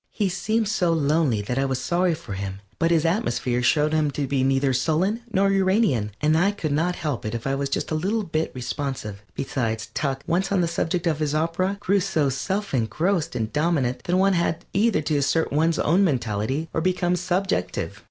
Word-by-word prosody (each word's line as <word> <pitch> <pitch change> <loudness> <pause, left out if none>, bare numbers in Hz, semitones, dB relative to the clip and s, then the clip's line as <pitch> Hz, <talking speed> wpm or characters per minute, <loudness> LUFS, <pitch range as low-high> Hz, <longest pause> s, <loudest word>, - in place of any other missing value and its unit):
He 205 -3 -1
seemed 215 +4 0
so 180 -5 +1
lonely 145 -7 +1
that 125 +5 -2
I 135 - +2
was 130 -2 -1
sorry 175 -1 +1
for 110 - -8
him, 95 0 -5 0.2
but 165 - +2
his 165 -1 +2
atmosphere 165 - 0
showed 150 +4 +2
him 155 -2 +2
to 145 0 -2
be 135 -1 0
neither 135 0 +2
sullen 165 - +1
nor 195 0 +3
Uranian, 190 - +2
and 155 +1 +2
I 180 +5 +4
could 200 -7 -3
not 165 +5 +1
help 150 -7 -3
it 110 +2 -3
if 115 - -5
I 135 - 0
was 140 0 -1
just - - -2
a - - 0
little 200 +8 0
bit 160 -3 -2
responsive. 125 -5 -4
Besides, 115 -5 -2
Tuck, 135 -3 -2
once 185 +3 0
on 195 -2 +3
the 170 - +1
subject 170 +1 -1
of 160 -3 +1
his 150 -1 0
opera, 170 +5 0
grew 200 0 +2
so 170 -7 +1
self 190 +10 -2
engrossed 160 - 0
and 110 -1 -2
dominant 145 -5 0
that 180 +1 +1
one 195 +1 +4
had 170 -1 0
either 205 -3 +2
to 150 0 0
assert 145 +3 +1
one's 160 +2 +2
own 175 +6 +3
mentality 130 - -1
or 160 - 0
become 180 0 +1
subjective. 185 +2 -1
160 Hz, 205 wpm, -24 LUFS, 135-185 Hz, 0.2 s, I